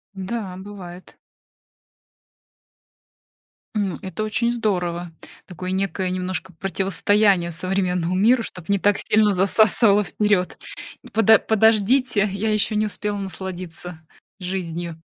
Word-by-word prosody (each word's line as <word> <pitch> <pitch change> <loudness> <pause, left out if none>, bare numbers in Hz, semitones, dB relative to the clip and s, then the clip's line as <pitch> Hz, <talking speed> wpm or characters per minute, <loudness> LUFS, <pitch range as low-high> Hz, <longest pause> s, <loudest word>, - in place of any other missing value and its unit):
Да, 190 -1 -5
бывает. 185 -2 -11 2.6
М, 200 -4 -1
это 190 +3 -4
очень 235 +2 0
здорово, 180 -7 -2 0.4
такое 185 +1 -6
некое 190 -1 -1
немножко 185 -1 -4
противостояние 195 0 +1
современному 180 0 -1
миру, 230 +5 +3
чтоб 180 -1 -9
не 200 - +3
так 205 +1 +2
сильно 210 -1 +3
засасывало 205 +2 +4
вперёд. 205 -3 0 0.5
Подо 220 0 +5
подождите, 220 +1 +2
я 215 +2 -1
ещё 215 +1 0
не 215 0 +1
успела 210 0 -3
насладиться 180 -2 -6 0.4
жизнью. 175 -3 -5
195 Hz, 105 wpm, -22 LUFS, 180-210 Hz, 2.6 s, Подо